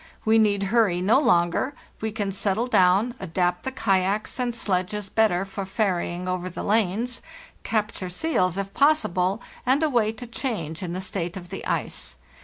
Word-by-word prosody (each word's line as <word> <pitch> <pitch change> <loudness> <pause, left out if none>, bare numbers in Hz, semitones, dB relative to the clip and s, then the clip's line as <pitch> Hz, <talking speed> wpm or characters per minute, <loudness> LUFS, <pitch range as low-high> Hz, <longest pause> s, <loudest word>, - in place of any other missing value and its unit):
We 220 +1 +5
need 205 -2 +3
hurry 210 -7 +3
no 205 +8 +4
longer; 230 - +2 0.3
we 220 0 -1
can 205 -2 -2
settle 200 +3 0
down, 195 +1 +3
adapt 180 0 0
the 265 - -4
kayaks 200 0 0
and 245 -2 -1
sledges 195 0 -1
better 195 -4 +2
for 195 0 -5
ferrying 185 -3 -1
over 185 0 -2
the 180 - -6
lanes, 220 +3 0 0.4
capture 210 -4 -2
seals 185 - 0
if 195 0 -4
possible, 220 - +2 0.2
and 265 +5 +2
await 225 -7 +1
a - - -5
change 210 - -4
in 175 -2 -4
the 185 - -3
state 185 -2 -4
of 175 -2 -9
the 195 - -6
ice. - - -2
195 Hz, 165 wpm, -25 LUFS, 180-225 Hz, 0.4 s, We